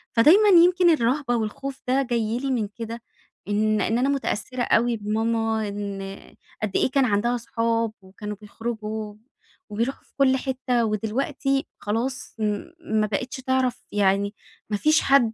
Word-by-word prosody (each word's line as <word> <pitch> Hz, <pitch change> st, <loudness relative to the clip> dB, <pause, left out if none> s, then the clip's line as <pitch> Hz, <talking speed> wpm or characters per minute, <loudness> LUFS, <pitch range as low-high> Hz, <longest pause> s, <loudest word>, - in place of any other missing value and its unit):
فدايمًا 370 Hz, -, +6 dB
يمكن 355 Hz, 0 st, +6 dB
الرهبة 260 Hz, -3 st, +2 dB
والخوف 260 Hz, +5 st, -4 dB
ده 265 Hz, +2 st, +3 dB
جاي 235 Hz, -2 st, -1 dB
لي 275 Hz, +1 st, -2 dB
من 230 Hz, -5 st, 0 dB
كده 230 Hz, +2 st, -7 dB, 0.5 s
إن 215 Hz, +1 st, +1 dB
إن 225 Hz, +4 st, +1 dB
أنا 265 Hz, +3 st, +2 dB
مُتأثِّرة 255 Hz, -2 st, -2 dB
أوي 235 Hz, 0 st, +2 dB
بماما 220 Hz, +1 st, 0 dB
إن 200 Hz, -1 st, -6 dB, 0.3 s
قد 210 Hz, -, 0 dB
إيه -, -, +2 dB
كان 275 Hz, -1 st, +3 dB
عندها 235 Hz, +2 st, +1 dB
صحاب 230 Hz, -1 st, -1 dB
وكانوا 210 Hz, +2 st, -7 dB
بيخرجوا 215 Hz, -1 st, -5 dB, 0.6 s
وبيروحوا 230 Hz, +6 st, -2 dB
في -, -, -31 dB
كل 265 Hz, -1 st, +4 dB
حتّة 255 Hz, -3 st, 0 dB
و 215 Hz, -, 0 dB
دلوقتي 270 Hz, +5 st, -1 dB
خلاص 235 Hz, +5 st, -3 dB
م 210 Hz, -2 st, -1 dB, 0.2 s
ما 215 Hz, -9 st, 0 dB
بقيتش 250 Hz, +7 st, -3 dB
تعرف 260 Hz, -1 st, 0 dB
يعني 200 Hz, 0 st, +2 dB, 0.4 s
ما 210 Hz, -, 0 dB
فيش 310 Hz, +8 st, +4 dB
حدّ 270 Hz, -5 st, +4 dB
230 Hz, 150 wpm, -24 LUFS, 215-260 Hz, 0.6 s, فدايمًا